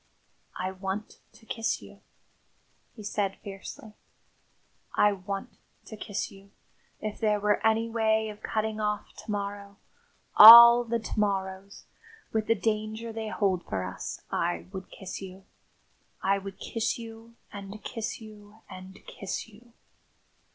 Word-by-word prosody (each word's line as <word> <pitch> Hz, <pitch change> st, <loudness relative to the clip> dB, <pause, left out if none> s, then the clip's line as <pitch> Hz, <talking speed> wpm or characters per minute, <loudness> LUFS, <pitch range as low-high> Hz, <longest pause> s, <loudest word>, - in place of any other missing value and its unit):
"I 185 Hz, +1 st, -3 dB
want 190 Hz, +2 st, -5 dB
to 225 Hz, +1 st, -19 dB
kiss 225 Hz, 0 st, -2 dB
you," -, -, -15 dB, 0.9 s
he 215 Hz, -, -10 dB
said 200 Hz, -1 st, -2 dB
fiercely. 205 Hz, +1 st, -9 dB, 1.0 s
"I 210 Hz, -, +5 dB
want 195 Hz, 0 st, -6 dB, 0.3 s
to 220 Hz, -, -9 dB
kiss 205 Hz, -1 st, -4 dB
you. 195 Hz, 0 st, -16 dB, 0.5 s
If 215 Hz, -1 st, -5 dB
there 210 Hz, -2 st, +1 dB
were 210 Hz, 0 st, +1 dB
any 225 Hz, +1 st, +2 dB
way 220 Hz, -1 st, +1 dB
of 210 Hz, 0 st, -10 dB
cutting 215 Hz, 0 st, -2 dB
off 210 Hz, -1 st, -2 dB
to -, -, -12 dB
morrow 200 Hz, -1 st, -4 dB, 0.6 s
all 235 Hz, +2 st, +12 dB
the 235 Hz, 0 st, 0 dB
to 220 Hz, -1 st, -5 dB
morrows 195 Hz, -1 st, -2 dB, 0.5 s
with 220 Hz, -1 st, 0 dB
the 225 Hz, -, +3 dB
danger 220 Hz, +1 st, -2 dB
they 220 Hz, 0 st, -4 dB
hold 195 Hz, -4 st, 0 dB
for 95 Hz, -, -3 dB
us -, -, -6 dB
I 175 Hz, +1 st, -1 dB
would 190 Hz, -1 st, -8 dB
kiss 190 Hz, 0 st, -8 dB
you. 190 Hz, 0 st, -10 dB, 0.8 s
I 195 Hz, +1 st, +2 dB
would 195 Hz, 0 st, -9 dB
kiss 230 Hz, -1 st, -2 dB
you, 230 Hz, 0 st, -11 dB, 0.2 s
and 200 Hz, +1 st, -9 dB
kiss 225 Hz, -2 st, -5 dB
you, 215 Hz, -1 st, -14 dB
and 185 Hz, +1 st, -10 dB
kiss 195 Hz, +2 st, -6 dB
you!" 225 Hz, +2 st, -19 dB
210 Hz, 140 wpm, -28 LUFS, 195-220 Hz, 1.0 s, all